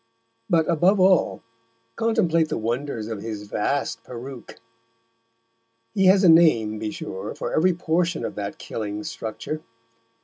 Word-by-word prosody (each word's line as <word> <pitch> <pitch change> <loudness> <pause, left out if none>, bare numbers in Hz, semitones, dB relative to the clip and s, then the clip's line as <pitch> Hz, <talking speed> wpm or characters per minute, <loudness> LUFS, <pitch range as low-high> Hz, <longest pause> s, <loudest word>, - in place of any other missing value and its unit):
But, 165 -2 +3
above 175 +4 +3
all 185 -1 +3 0.5
contemplate 165 -8 +2
the - - -2
wonders 115 +1 -3
of 110 -3 -5
his 110 -2 -5
vast 105 +7 -2
peruke. 125 +1 -9 1.3
He 195 -1 +3
has 190 +1 +6
a - - +6
name, 120 -11 +5
be 110 0 -3
sure, 95 -1 -6
for - - -4
every 180 +3 +3
portion 170 0 0
of - - -4
that 100 -1 -5
killing 105 -1 -5
structure. 115 +10 -5
145 Hz, 135 wpm, -24 LUFS, 110-170 Hz, 1.3 s, has